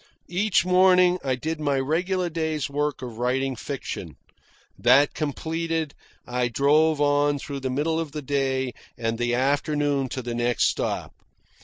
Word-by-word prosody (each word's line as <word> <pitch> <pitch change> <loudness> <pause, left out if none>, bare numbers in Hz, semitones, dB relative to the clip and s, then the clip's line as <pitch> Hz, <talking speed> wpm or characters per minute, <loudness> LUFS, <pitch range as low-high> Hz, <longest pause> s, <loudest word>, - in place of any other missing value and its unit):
Each 185 +1 +2
morning 180 0 +5
I 130 -2 0
did 160 +5 -4
my 145 -2 0
regular 180 +6 0
day's 160 -3 -2
work 145 -1 -1
of 120 -2 -7
writing 130 +2 0
fiction. - - -6 0.6
That 140 +2 +4
completed, 160 +1 -2 0.3
I 125 0 0
drove 150 +5 +3
on 145 0 +2
through 140 0 -6
the 130 -1 -3
middle 155 +5 0
of 160 -3 -4
the 150 0 -6
day 130 -2 -1 0.2
and 115 -1 -2
the 120 0 +1
afternoon 140 +1 +1
to 130 +1 -4
the 120 0 -4
next 120 +1 +2
stop. - - -3
145 Hz, 150 wpm, -25 LUFS, 130-160 Hz, 0.6 s, morning